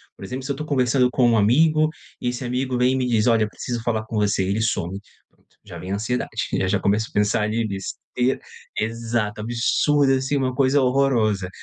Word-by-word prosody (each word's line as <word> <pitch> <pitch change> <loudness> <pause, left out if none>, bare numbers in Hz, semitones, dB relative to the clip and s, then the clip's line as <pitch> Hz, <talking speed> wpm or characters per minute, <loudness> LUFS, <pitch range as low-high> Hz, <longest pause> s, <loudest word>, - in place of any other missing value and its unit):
Por - - -12
exemplo, 130 +1 -5
se 135 - -3
eu - - -2
tô 150 +2 -5
conversando 125 -3 +2
com 125 -2 +3
um 115 - +3
amigo 155 +8 +4 0.3
e 125 - -1
esse 125 +1 -4
amigo 125 +1 -1
vem 125 +1 +3
e - - 0
me 130 -1 0
diz: 115 -2 +2
"Olha, 115 -3 +3
preciso 120 +2 -5
falar 110 -2 -1
com 110 - -7
você." 105 -2 +1
Ele 100 +4 -1
some, 95 -3 -1 0.4
pronto, - - -35
já - - -10
vem 95 +1 -6
a - - +1
ansiedade. 110 +5 -2 0.4
Já 100 +2 +1
começo 105 +3 +1
a - - -28
pensar 105 +1 +1
ali 110 +2 0
bestei 115 +6 -2 0.4
exato, 115 -1 -2
absurda 135 +5 +2
assim, 130 +2 -1
uma 130 -2 0
coisa 135 +2 +3
horrorosa. 120 -7 +1
120 Hz, 205 wpm, -22 LUFS, 105-130 Hz, 0.4 s, amigo